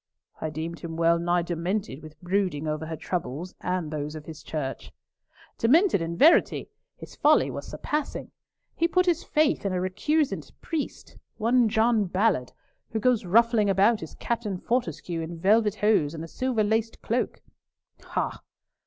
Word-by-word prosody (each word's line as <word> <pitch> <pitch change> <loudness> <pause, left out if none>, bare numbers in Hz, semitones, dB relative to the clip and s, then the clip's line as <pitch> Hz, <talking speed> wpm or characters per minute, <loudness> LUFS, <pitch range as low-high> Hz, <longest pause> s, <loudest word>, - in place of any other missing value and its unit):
"I 160 - -2
deemed 160 +2 -5
him 165 -1 -6
well 170 0 +3
nigh 175 0 +1
demented 175 -2 -3
with 155 -1 -13
brooding 180 -5 -1
over 155 +1 -2
her 160 - -4
troubles 170 +1 -4
and 180 -4 -2
those 150 0 -4
of 155 -1 -8
his 160 -1 -9
church." 140 -4 -5 0.7
"Demented 300 - +4
in 165 +1 -3
verity. 315 +5 +4 0.3
His - - -11
folly - - +4
was - - -6
surpassing. 300 -1 -3 0.4
He 335 - +2
put 365 +1 +2
his 345 -2 +1
faith 305 -1 +1
in 195 -2 -1
a 180 - 0
recusant 280 - -1
priest—one 245 -6 -1
John 220 -1 +3
Ballard—who 185 - -2
goes 240 -2 +2
ruffling 225 +2 +4
about 200 +4 +3
as 160 - -8
Captain 225 -5 -2
Fortescue 180 - -2
in 165 +1 -6
velvet 210 +3 +3
hose 205 -8 +2
and 160 - -6
a - - -6
silver 250 +3 0
laced 220 +2 -1
cloak." 240 +3 -2 0.6
"Ha!" - - -3
190 Hz, 155 wpm, -26 LUFS, 165-230 Hz, 0.7 s, Demented